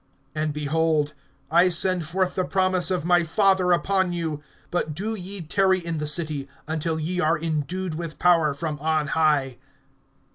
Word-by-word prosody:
(49)And, 155 Hz, 0 st, -1 dB
behold, 150 Hz, 0 st, 0 dB, 0.4 s
I 175 Hz, +3 st, +5 dB
send 180 Hz, 0 st, 0 dB
forth 185 Hz, +2 st, 0 dB
the 185 Hz, -, 0 dB
promise 185 Hz, -1 st, +1 dB
of 180 Hz, -4 st, -1 dB
my 175 Hz, 0 st, +4 dB
Father 190 Hz, +1 st, +2 dB
upon 190 Hz, +1 st, +1 dB
you. 160 Hz, -4 st, -3 dB, 0.3 s
But 160 Hz, -4 st, -1 dB
do 210 Hz, +6 st, -3 dB
ye 195 Hz, -1 st, -6 dB
tarry 190 Hz, +4 st, +2 dB
in 170 Hz, -2 st, -4 dB
the 150 Hz, -, -2 dB
city, 150 Hz, -3 st, 0 dB, 0.2 s
until 160 Hz, 0 st, -2 dB
ye 175 Hz, +4 st, -2 dB
are 165 Hz, -1 st, +2 dB
endued 165 Hz, +3 st, -3 dB
with 160 Hz, -1 st, -6 dB
power 165 Hz, -5 st, +3 dB
from 150 Hz, 0 st, -4 dB
on 155 Hz, -1 st, 0 dB
high. 145 Hz, -5 st, +1 dB
165 Hz, 160 wpm, -24 LUFS, 155-185 Hz, 0.4 s, I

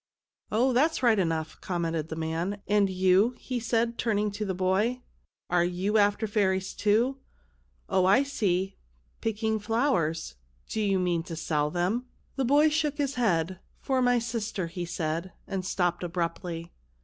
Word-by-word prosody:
" -, -, -66 dB
Oh, 250 Hz, +4 st, +3 dB
that's 290 Hz, +3 st, +2 dB
right 225 Hz, -4 st, +5 dB
enough," 165 Hz, -3 st, -2 dB
commented 165 Hz, -3 st, -2 dB
the 160 Hz, -, -4 dB
man; 165 Hz, +5 st, -2 dB
" -, -, -39 dB
and 205 Hz, -1 st, +3 dB
you," 190 Hz, +5 st, +3 dB
he 255 Hz, -2 st, -4 dB
said, 230 Hz, 0 st, 0 dB
turning 210 Hz, -2 st, +1 dB
to 205 Hz, +2 st, -4 dB
the 190 Hz, -3 st, -2 dB
boy, 200 Hz, +7 st, +1 dB, 0.2 s
" -, -, -56 dB
are 175 Hz, -1 st, +4 dB
you 185 Hz, +5 st, +1 dB
after 205 Hz, +2 st, +2 dB
fairies, 190 Hz, -3 st, 0 dB
too? 235 Hz, +6 st, +2 dB, 0.7 s
Oh, 185 Hz, -1 st, +2 dB
I 205 Hz, +8 st, +5 dB
see; 195 Hz, -8 st, -1 dB, 0.4 s
picking 220 Hz, 0 st, 0 dB
flowers. 210 Hz, -, 0 dB, 0.3 s
Do 220 Hz, -, -2 dB
you 200 Hz, -2 st, +2 dB
mean 175 Hz, -2 st, +1 dB
to 170 Hz, -3 st, -6 dB
sell 150 Hz, -2 st, 0 dB
them? 185 Hz, +10 st, -1 dB
" -, -, -38 dB
The 270 Hz, -1 st, 0 dB
boy 290 Hz, +5 st, +5 dB
shook 300 Hz, -1 st, 0 dB
his 280 Hz, -2 st, 0 dB
head. 185 Hz, -, 0 dB
" -, -, -37 dB
For 265 Hz, -1 st, +1 dB
my 245 Hz, 0 st, +4 dB
sister," 225 Hz, -5 st, -2 dB
he 175 Hz, +1 st, -5 dB
said, 170 Hz, +1 st, -3 dB
and 190 Hz, -1 st, -3 dB
stopped 175 Hz, -2 st, 0 dB
abruptly. 170 Hz, -1 st, -3 dB
200 Hz, 175 wpm, -28 LUFS, 175-230 Hz, 0.7 s, right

